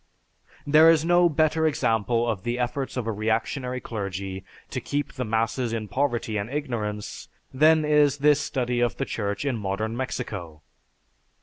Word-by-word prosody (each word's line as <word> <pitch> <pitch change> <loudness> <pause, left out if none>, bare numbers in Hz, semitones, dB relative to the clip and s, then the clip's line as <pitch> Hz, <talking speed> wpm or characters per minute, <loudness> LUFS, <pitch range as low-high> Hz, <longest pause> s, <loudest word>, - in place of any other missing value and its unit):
There 155 +3 +7
is 165 -1 +4
no 175 0 +5
better 160 +1 +2
example 115 -4 +1
of 110 -5 -1
the 120 +4 -2
efforts 130 +2 -2
of 125 - -2
a 115 - -1
reactionary 125 +4 -1
clergy 100 -4 -5 0.3
to - - -3
keep 145 0 -3
the 130 - -3
masses 115 +1 -1
in 110 -2 -3
poverty 120 -5 -1
and 100 +2 -3
ignorance 115 -8 -4 0.3
than 155 +3 +4
is 150 -2 +4
this 145 0 +4
study 125 -3 -1
of 120 -1 0
the 135 - -1
church 100 +1 -3
in 135 -4 0
modern 105 +3 -2
Mexico. 100 -11 -5
120 Hz, 160 wpm, -25 LUFS, 110-145 Hz, 0.3 s, There